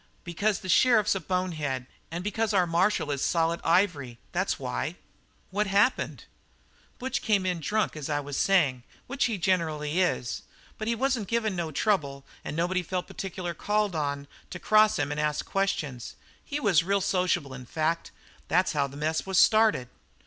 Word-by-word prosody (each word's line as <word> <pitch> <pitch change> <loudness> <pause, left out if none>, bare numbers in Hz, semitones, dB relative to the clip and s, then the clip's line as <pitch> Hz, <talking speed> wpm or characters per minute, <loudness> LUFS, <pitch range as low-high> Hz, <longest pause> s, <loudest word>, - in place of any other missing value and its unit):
"Because 200 +5 -1
the 185 - -8
sheriff's 215 +2 +4
a 195 - -2
bonehead 155 -9 -2 0.2
and 170 +2 -5
because 215 +2 -1
our 185 -2 +4
marshal 170 -2 +1
is 140 -1 -2
solid 165 0 +1
ivory. 165 -9 +1
That's - - 0
why." 60 0 -3 0.6
"What 205 +2 0
happened?" 200 +6 +1 0.7
"Butch 260 +2 -2
came 205 -4 +1
in 180 -2 0
drunk, 210 +6 0
as 155 -1 -5
I 145 -1 +1
was 145 -1 -6
saying, 145 -11 +2 0.2
which 275 +1 0
he 225 -4 -1
generally 165 -3 0
is, 125 -9 -1 0.4
but 215 - -3
he 235 - +1
wasn't 250 -4 0
giving 220 -3 0
no 170 -2 -2
trouble 175 -1 +1
at - - -8
all, 140 0 -18
and 150 - -4
nobody 180 +2 +1
felt 180 +1 -3
particular 180 -2 -5
called 205 +2 0
on 145 -2 -2 0.2
to - - -6
cross 215 +3 +4
him 145 0 -1
and 150 - -3
ask 150 0 -1
questions. 150 -11 -2 0.3
He 290 - -4
was 200 - +4
real 200 +3 +1
sociable, 180 -7 0
in 125 -1 -9
fact, 160 +4 -1
and - - -28 0.3
that's 180 +3 +2
how 140 -2 +1
the 140 +1 -11
mess 155 +4 -1
was 190 -1 0
started." 215 - +5
180 Hz, 180 wpm, -27 LUFS, 150-205 Hz, 0.7 s, started